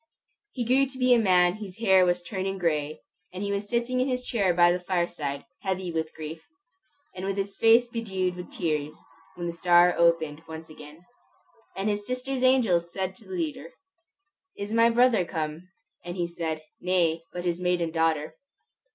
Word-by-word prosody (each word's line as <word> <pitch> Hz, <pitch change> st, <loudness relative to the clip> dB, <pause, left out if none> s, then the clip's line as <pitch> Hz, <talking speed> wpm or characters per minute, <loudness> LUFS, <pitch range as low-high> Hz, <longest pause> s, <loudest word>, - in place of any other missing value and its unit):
He 245 Hz, -3 st, -3 dB
grew 265 Hz, +3 st, +3 dB
to 260 Hz, 0 st, -10 dB
be 255 Hz, -1 st, +4 dB
a 240 Hz, -, +5 dB
man 180 Hz, -2 st, +4 dB
whose 195 Hz, -4 st, -8 dB
hair 190 Hz, -5 st, +4 dB
was 175 Hz, 0 st, 0 dB
turning 195 Hz, 0 st, -3 dB
gray, 155 Hz, -4 st, -1 dB, 0.3 s
and 185 Hz, +2 st, -5 dB
he 200 Hz, -, -2 dB
was 200 Hz, +1 st, -3 dB
sitting 240 Hz, +1 st, 0 dB
in 255 Hz, -, +1 dB
his 250 Hz, -1 st, -2 dB
chair 200 Hz, -6 st, +1 dB
by 175 Hz, 0 st, +5 dB
the 180 Hz, -, 0 dB
fireside, 175 Hz, -6 st, -2 dB, 0.2 s
heavy 190 Hz, -2 st, -2 dB
with 160 Hz, -1 st, -3 dB
grief, 160 Hz, +1 st, -7 dB, 0.7 s
and 185 Hz, -, -7 dB
with 195 Hz, 0 st, -2 dB
his 195 Hz, 0 st, -3 dB
face 230 Hz, +2 st, +6 dB
bedewed 190 Hz, -6 st, -2 dB
with 180 Hz, 0 st, -9 dB
tears, 155 Hz, -3 st, -2 dB, 0.4 s
when 175 Hz, -, -5 dB
the 170 Hz, -, -3 dB
star 175 Hz, +1 st, +5 dB
opened 165 Hz, -3 st, +2 dB
once 160 Hz, 0 st, -9 dB
again. 155 Hz, +3 st, -13 dB, 0.7 s
Said 195 Hz, +2 st, -1 dB
his 205 Hz, -1 st, -2 dB
sister's 255 Hz, +1 st, -3 dB
angel 245 Hz, -10 st, +4 dB
to 185 Hz, +2 st, -4 dB
the -, -, -27 dB
leader, 335 Hz, -, -4 dB, 0.8 s
"Is 200 Hz, +2 st, -5 dB
my 230 Hz, +1 st, +5 dB
brother 235 Hz, -4 st, +4 dB
come?" 160 Hz, +1 st, -5 dB, 0.3 s
And 175 Hz, 0 st, -6 dB
he 175 Hz, -, 0 dB
said, 160 Hz, -2 st, -4 dB, 0.2 s
"Nay, 175 Hz, -4 st, +1 dB
but 180 Hz, 0 st, -6 dB
his 175 Hz, 0 st, -1 dB
maiden 180 Hz, -2 st, 0 dB
daughter." 160 Hz, -2 st, 0 dB
180 Hz, 175 wpm, -27 LUFS, 170-225 Hz, 0.8 s, face